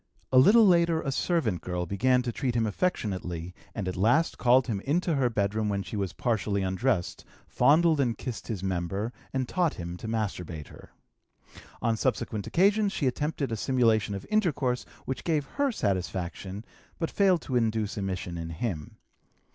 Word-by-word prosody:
A 130 - +7
little 220 - +7
later 170 -3 +4
a 135 - -1
servant 130 - 0
girl 90 -1 -3
began 125 +8 +2
to 120 - -2
treat 125 +1 -2
him 115 -1 +2
affectionately 95 - -2 0.2
and 100 -4 -3
at 90 - -2
last 120 - +2
called 125 +1 +5
him 110 -5 -2
into 165 - 0
her 135 -4 +2
bedroom 105 0 0
when 100 -1 -1
she - - -7
was 100 -3 -1
partially 105 -4 -1
undressed, 95 +1 -1 0.2
fondled 160 +1 +4
and 120 -4 +1
kissed 125 -3 -6
his 105 -6 -4
member, 95 +5 -2 0.2
and 130 -2 -1
taught 175 0 0
him 85 0 -6
to 110 - -7
masturbate 90 -8 -3
her. - - -14 0.9
On 115 - +2
subsequent 110 -3 -1
occasions 200 +3 +3
she 145 - -2
attempted 140 0 -1
a - - 0
simulation 110 -3 +2
of 100 - -7
intercourse, 145 - +1 0.2
which 130 - -4
gave 155 -4 0
her 280 - 0
satisfaction, 95 - -3 0.3
but 165 - -2
failed 190 -4 +3
to 130 - -3
induce 110 -3 0
emission 90 -3 -3
in 85 0 -5
him. 85 -2 -4
115 Hz, 170 wpm, -28 LUFS, 95-140 Hz, 0.9 s, A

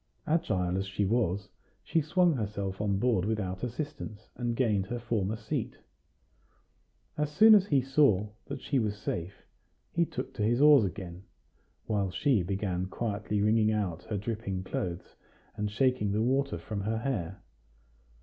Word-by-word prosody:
Agile 95 - 0
as 95 - -3
she 95 +1 -1
was, 100 -3 0 0.4
she 165 - +1
swung 175 +3 +3
herself 100 -5 -3
on 100 -2 +1
board 110 -4 +2
without 100 -3 -2
assistance, 125 -4 -5
and 120 -1 -2
gained 105 -6 +1
her 120 - -3
former 110 -3 -1
seat. 110 0 -4 1.4
As 150 -1 +1
soon 220 +8 +8
as 200 -2 +6
he 140 -6 +3
saw 135 -7 +3 0.2
that 140 -2 -5
she 140 - +1
was 105 -3 -1
safe, 90 -2 -5 0.5
he 170 0 +2
took 130 +1 -5
to 125 - -5
his 115 +4 +2
oars 145 -5 +7
again, 90 -2 -6 0.6
while 100 -4 0
she 125 +2 +2
began 95 -1 -2
quietly 105 0 -2
wringing 110 0 +3
out 95 -6 -1
her 105 - -3
dripping 100 -3 -3
clothes, 90 -2 -4 0.4
and 105 -1 -2
shaking 125 -1 +1
the 105 +2 +1
water 135 -4 +1
from 100 +4 -5
her 110 +3 -1
hair. 105 -8 -3
105 Hz, 155 wpm, -30 LUFS, 95-130 Hz, 1.4 s, soon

